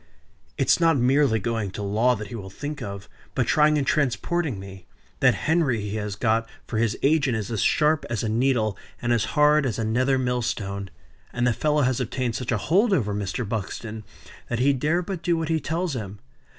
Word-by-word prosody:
"It's - - +3
not 165 -3 +4
merely 130 -1 +3
going 110 -1 -2
to 100 +2 -6
law 110 +5 +2
that 105 -1 -7
he 120 - -7
will 95 -4 -7
think 145 +8 -6
of, 100 -2 -6 0.3
but 125 - +1
trying 150 +3 +4
and 140 - 0
transporting 145 - 0
me. 95 -1 -11 0.3
That - - +4
Henry 155 -7 +2
he 105 +1 -4
has 105 -2 -3
got 115 +2 +1 0.2
for 110 - -3
his 115 -1 +1
agent 140 -5 +3
is 110 0 -4
as 110 -4 -1
sharp 155 0 +2
as 120 -1 -2
a - - -1
needle, 110 -2 +1 0.2
and 120 0 0
as 115 -2 +1
hard 150 0 +5
as 120 -6 -1
a 115 - -1
nether 130 +5 +2
mill 125 -1 0
stone. 100 -3 -3 0.4
And 120 0 -1
the 125 - +3
fellow 150 +3 +1
has 130 0 +1
obtained 125 -1 -2
such 125 0 -3
a 115 - +2
hold 195 - +2
over 105 - +1
Mr. 100 +3 -3
Buxton, 110 +1 -5 0.5
that 120 - -1
he 135 +4 +3
dare 155 +7 0
but 180 -1 -5
do 170 -1 +1
what 165 -1 -2
he 160 -1 +2
tells 165 +1 -2
him. 105 -4 -6
120 Hz, 210 wpm, -24 LUFS, 110-150 Hz, 0.5 s, hard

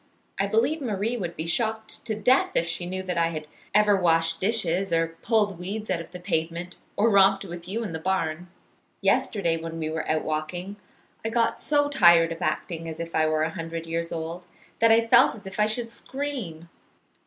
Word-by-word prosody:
I 195 - +2
believe 245 +10 +1
Marie 220 -1 -1
would 175 -7 -4
be 160 - -4
shocked 220 +5 -2
to 220 - -1
death 250 +6 +3
if 165 - +3
she 170 +1 -2
knew 185 +1 -4
that 180 -2 -2
I 165 - +3
had 155 -2 -5 0.2
ever 210 0 +5
washed 165 -3 +2
dishes, 195 -3 +1
or 165 0 +2
pulled 210 -5 +1
weeds 205 +3 -4
out 170 -2 0
of 165 - -11
the 180 0 -9
pavement, 175 0 -3 0.2
or 220 +2 +3
romped 195 0 +5
with 175 -1 -8
you 220 +5 -3
in 195 -7 -5
the 160 - -3
barn. 175 -1 -1 0.5
"Yesterday 170 -6 +1
when 165 0 -6
we 155 -1 -3
were 160 0 -3
out 155 0 +1
walking 175 +6 -4 0.5
I 225 - -1
got 230 0 +1
so 290 -1 +2
tired 170 -11 +5
of 165 - -6
acting 165 +1 -2
as 160 - -7
if 170 0 -5
I 155 0 +3
were 155 0 +1
a 160 - -1
hundred 165 -1 -5
years 165 0 -3
old, 170 +2 -5 0.3
that 230 0 +5
I 225 +1 +5
felt 240 +2 +5
as 210 -2 -13
if 190 +2 -8
I 210 - +4
should 230 +1 -3
scream. 235 - -5
180 Hz, 205 wpm, -26 LUFS, 165-220 Hz, 0.5 s, ever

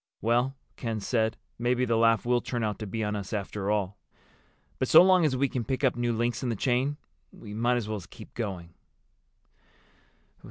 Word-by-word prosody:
'" - - -56
"Well," 120 +5 +1 0.2
Ken 115 -3 -3
said, 110 +1 0 0.2
"maybe 125 +1 +1
the 115 -1 +1
laugh 115 0 +3
will 120 0 +2
turn 120 -2 -3
out 105 -1 -2
to 110 - -5
be 110 +3 -3
on 105 0 -1
us 100 +1 -5
after 100 -1 -3
all. 100 -1 -1 0.8
But - - 0
so - - +9
long 185 -2 +5
as 130 -4 +1
we 140 +2 +2
can 125 -2 -3
pick 130 +5 -3
up 130 - +3
new 120 0 0
links 120 0 -1
in 125 - -2
the 115 - -1
chain 130 +6 0 0.3
we 105 - -11
might 120 +3 +1
as 115 -3 -3
well 110 -2 -3
keep - - -13
going." 95 -7 -5
115 Hz, 200 wpm, -28 LUFS, 105-125 Hz, 0.8 s, so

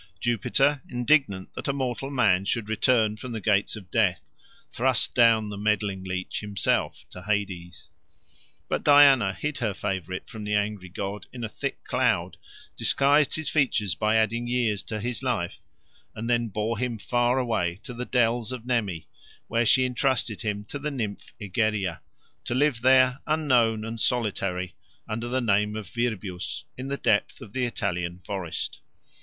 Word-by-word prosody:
Jupiter, 135 +5 +2
indignant 125 -6 +1
that - - -5
a 140 - +1
mortal 135 0 -2
man 110 -9 +3
should 110 +1 -1
return 110 -1 +2
from 120 +2 -7
the 110 - -3
gates 105 0 +1
of 95 -4 -11
death, 95 -8 +1 0.4
thrust 130 0 +2
down 115 -3 +4
the 100 -1 -6
meddling 105 -2 0
leech 90 0 -3
himself 105 -2 -1
to 90 - -9
Hades. 95 -5 -3 0.8
But - - -1
Diana 140 -8 +7
hid 150 +9 -4
her 110 -6 -1
favourite 95 -3 -4
from 110 -2 -8
the 105 0 -1
angry 105 -3 -1
god 100 +2 -5
in 120 -1 -7
a - - -1
thick - - -5
cloud, - - 0 0.4
disguised 140 +1 +3
his 160 -3 -2
features 115 - +2
by 110 +4 +1
adding 115 +2 +1
years 120 -5 +1
to 110 -1 -4
his 120 +3 -2
life, 115 -10 -2 0.5
and 115 +2 -5
then 120 -1 +2
bore 110 +2 -2
him 125 -2 -2
far 120 +4 +1
away 100 -8 0
to 130 - -7
the 120 +1 -4
dells 120 -1 +1
of 125 -2 -6
Nemi, 105 -9 -1 0.4
where 115 0 +2
she 130 +3 +5
entrusted 125 -3 0
him 105 -2 -3
to 140 - -6
the 150 +2 -2
nymph 115 -8 -5
Egeria, 100 -3 -1 0.4
to 120 - -2
live 135 -3 +2
there, 130 0 +5
unknown 125 -8 +2
and 115 0 -4
solitary, 95 -7 -1 0.3
under 115 +2 -3
the 130 +2 0
name 105 -2 +2
of 110 -3 -5
Virbius, 100 -4 -3
in 130 +1 -6
the 140 0 -2
depth - - +1
of 100 - -11
the 130 -1 0
Italian 90 -6 -2
forest. 90 -2 -4
110 Hz, 165 wpm, -26 LUFS, 100-125 Hz, 0.8 s, Diana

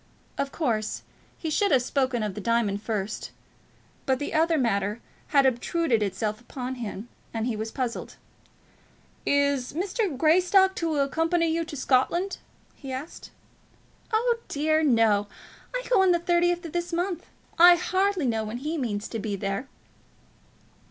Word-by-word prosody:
Of 280 0 -2
course, 225 -9 -1 0.3
he 320 - -4
should 405 +5 +2
have 255 -3 +4
spoken 255 -3 0
of 210 -2 -2
the 210 - -6
diamonds 215 -2 +1
first; 215 -2 -3 0.8
but 265 -1 +3
the 290 - -4
other 325 +1 +3
matter 210 -4 0 0.3
had 280 -2 +4
obtruded 260 0 +1
itself 210 +2 -2
upon 250 +1 -5
him, 215 0 -5 0.3
and 225 0 -1
he 240 -2 -1
was 220 +1 -4
puzzled. 245 -1 -4 1.1
"Is 280 -3 +1
Mr. 370 - -1
Greystock 365 +5 +4
to 330 -2 -1
accompany 325 +4 +1
you 330 - 0
into 320 -2 -6
Scotland?" 295 +9 +1 0.3
he 270 -2 -9
asked. 265 +5 -7 0.8
"Oh 465 +1 +2
dear 310 +2 +1
no. 225 -7 +3 0.4
I - - -3
go 460 -6 +4
on 380 -1 +5
the - - +3
thirtieth 345 0 +1
of 325 - -6
this 345 0 -2
month. 350 0 -2 0.3
I 350 +1 +9
hardly 375 -1 0
know 225 -3 0
when 215 +2 -5
he 305 +5 -3
means 210 -5 -2
to 225 - -4
be 210 -1 -3
there." 195 +5 -3
280 Hz, 150 wpm, -26 LUFS, 225-345 Hz, 1.1 s, I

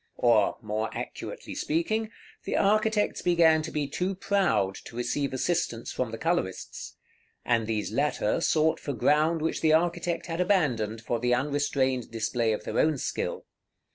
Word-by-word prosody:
Or, 115 -4 +3
more 110 +1 -2
accurately - - -6
speaking, 215 +8 -1 0.3
the - - -1
architects 215 +1 +2
began 165 -3 +4
to 155 - -5
be 150 -2 -2
too 180 +7 -2
proud 190 - +1
to - - -10
receive 125 +4 -1
assistance 130 -4 -1
from 130 -2 -2
the 115 - -6
colorists; 165 - -3 0.5
and 115 -2 +1
these 110 -2 -2
latter 140 +1 0
sought 160 -1 +2
for 145 - -4
ground 155 +6 +2
which 160 - -1
the 155 -1 +4
architect 170 +1 +1
had 165 0 -2
abandoned, 125 - +1
for 115 +1 -2
the 125 +1 +2
unrestrained 135 -2 0
display 115 0 0
of 105 - -2
their - - -2
own 155 -2 +3
skill. - - -3
145 Hz, 155 wpm, -27 LUFS, 115-170 Hz, 0.5 s, began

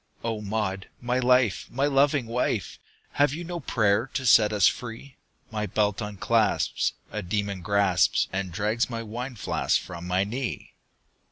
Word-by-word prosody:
"O 115 -2 -2
Maud, 100 -2 -2
my 125 +1 0
life! 125 -4 +3
my 135 +3 0
loving 140 -1 +3
wife! 115 -4 -2 0.3
Have 145 0 +2
you 170 - -5
no 175 0 -5
prayer 110 -3 +1
to 130 - -1
set 110 -3 +6
us 105 -4 +3
free? 120 +3 -4 0.4
My 105 -1 -2
belt 105 0 0
unclasps, 105 -3 +1 0.2
a 105 - -3
demon 100 0 -2
grasps 100 -1 +2
And 95 -1 -2
drags 105 +6 0
my 115 -1 -4
wine 120 +4 -6
flask 105 - 0
from 85 0 -8
my 90 +1 +2
knee!" 120 +5 -4
110 Hz, 155 wpm, -26 LUFS, 100-125 Hz, 0.4 s, set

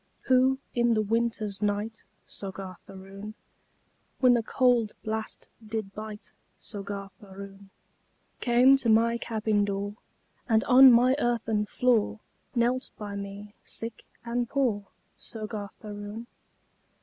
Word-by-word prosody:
Who, 260 +1 +4 0.2
in 240 -1 +3
the 215 - +2
winter's 220 -2 -1
night, 210 +2 -2 0.2
Soggarth 190 -2 -8
Aroon, 195 +2 -9 0.8
When 250 -2 +6
the 240 - +3
cowld 240 -2 +2
blast 220 0 -4 0.2
did 215 -2 -4
bite, 215 0 -8 0.3
Soggarth 200 -2 -6
Aroon, 195 0 -11 0.7
Came 250 +3 +5
to 255 -4 -1
my 230 +2 +4
cabin 215 -3 0
door, 200 +1 -3 0.5
And 220 -1 +4
on 260 +1 +9
my 250 +2 +5
earthen 225 -4 0
floor 235 -3 +2 0.4
Knelt 245 +2 +1
by 205 -1 -6
me, 200 +1 -7
sick 230 0 -5 0.2
and 240 0 -1
poor, 230 -8 0 0.3
Soggarth 215 -2 -7
Aroon? 205 +2 -7
220 Hz, 115 wpm, -28 LUFS, 205-235 Hz, 0.8 s, on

